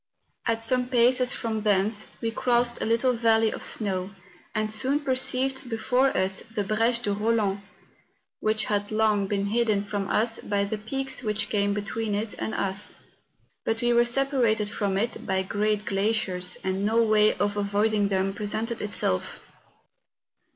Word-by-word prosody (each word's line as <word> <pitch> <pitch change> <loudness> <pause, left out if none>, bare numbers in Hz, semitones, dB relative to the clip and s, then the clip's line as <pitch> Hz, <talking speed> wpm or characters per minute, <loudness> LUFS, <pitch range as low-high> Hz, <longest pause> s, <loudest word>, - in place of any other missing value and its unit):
At 225 0 0
some 250 +2 +1
paces 250 0 +3
from 220 -2 -3
thence 210 +1 +1
we 230 - -1
crossed 240 0 +1
a - - 0
little 235 +3 +2
valley 225 -1 +3
of - - -7
snow, 190 -3 -2 0.5
and 215 0 -1
soon 265 +6 +1
perceived 265 -1 +1
before 250 +3 +2
us 190 0 +1
the 225 -2 -4
Breche 230 +4 +1
de 205 - 0
Eoland, 210 -2 0 0.8
which 215 0 0
had 205 -1 -1
long 215 -2 +2
been 200 0 -1
hidden 215 -1 +1
from 200 -1 -3
us 225 +1 +1
by 200 -1 -1
the 205 +1 -3
peaks 265 +4 -3
which 215 -2 -1
came 205 -1 +1
between 210 +1 -2
it 210 +1 -2
and 220 - -3
us. 195 +1 0 0.7
But 225 0 -1
we 240 0 +3
were 235 0 +5
separated 240 -4 +1
from 200 -3 -1
it 230 +4 -2
by 190 0 +1
great 210 +2 -1
glaciers, 195 -3 0
and 190 +1 -1
no 225 +3 +3
way 215 -1 +4
of 205 0 -1
avoiding 205 +1 +1
them 195 0 0
presented 215 +3 -3
itself. 150 - -1
215 Hz, 160 wpm, -26 LUFS, 205-235 Hz, 0.8 s, were